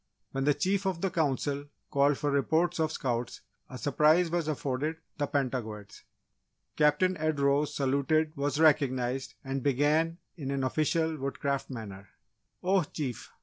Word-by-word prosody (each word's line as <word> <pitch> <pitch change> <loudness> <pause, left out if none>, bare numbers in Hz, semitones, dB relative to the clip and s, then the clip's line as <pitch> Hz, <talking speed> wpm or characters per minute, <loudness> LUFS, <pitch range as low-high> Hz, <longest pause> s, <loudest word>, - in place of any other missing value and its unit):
When 135 0 -1
the 145 -1 +4
Chief 195 +6 0
of 180 -3 -2
the 195 - 0
Council 145 -2 0 0.3
called 140 0 +3
for 145 -1 -1
reports 160 +5 +1
of 160 -1 +1
Scouts, 120 -5 -3 0.3
a 130 - -7
surprise 155 +5 +3
was 170 -2 0
afforded 145 +1 -1 0.2
the 145 - +1
Pentagoets. 120 -8 -3 0.7
Captain 150 +5 +3
Ed 155 -1 0
rose, 140 +1 +2
saluted, 145 +3 +1
was 145 +1 -1
recognised, 130 -4 +2
and 135 0 -3
began 150 +5 +2 0.2
in 140 -5 -5
an 140 -1 -1
official 160 +3 +1
Woodcraft 140 0 -2
manner: 100 -6 -8 0.5
"Oh 190 +1 +3
Chief! 145 -6 -5
145 Hz, 145 wpm, -29 LUFS, 135-160 Hz, 0.7 s, the